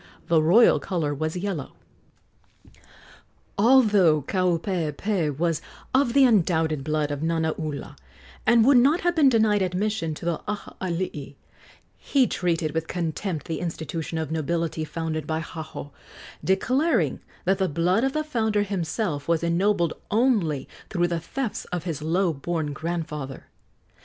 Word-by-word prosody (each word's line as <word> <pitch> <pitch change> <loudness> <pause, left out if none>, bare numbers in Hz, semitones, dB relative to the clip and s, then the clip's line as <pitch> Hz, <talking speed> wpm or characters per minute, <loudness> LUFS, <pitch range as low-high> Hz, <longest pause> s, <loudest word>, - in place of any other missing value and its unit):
The 165 -2 +4
royal 185 +10 +5
color 165 -6 -2
was 155 +4 -3
yellow. 180 -7 -4 1.8
Although 205 - +5
Kaupeepee 175 -2 -1
was 165 -1 0 0.3
of 260 -2 +3
the 275 - +6
undoubted 160 - +2
blood 150 0 -1
of 145 0 -3
Nanaula, 160 -3 -2 0.5
and 230 0 +5
would 275 0 +6
not 285 +8 +4
have 350 0 +1
been 295 -4 +6
denied 220 -4 +3
admission 185 -2 -1
to 170 - -9
the 170 -2 -1
Aha 210 0 -5
alii, 170 -6 -3 0.6
he 270 -3 +2
treated 170 -7 -1
with 160 +1 -2
contempt 170 0 -3
the 160 -2 -3
institution 165 -1 -4
of 160 -1 -3
nobility 160 0 -1
founded 155 -1 -4
by 160 0 -1
Haho, 160 -3 -7 0.5
declaring 255 - +1 0.3
that 190 +2 +2
the 190 -1 +1
blood 175 - +1
of 270 0 +1
the 310 - 0
founder 220 -8 0
himself 180 -5 -2
was 170 -1 +1
ennobled 170 0 +1 0.2
only 205 - +1 0.2
through 175 -3 +1
the 170 -1 -1
thefts 240 +7 -4
of 180 -2 -4
his 165 -5 -4
low 170 +3 +1
born 155 +1 -3
grandfather. 150 -4 -5
170 Hz, 135 wpm, -25 LUFS, 160-210 Hz, 1.8 s, the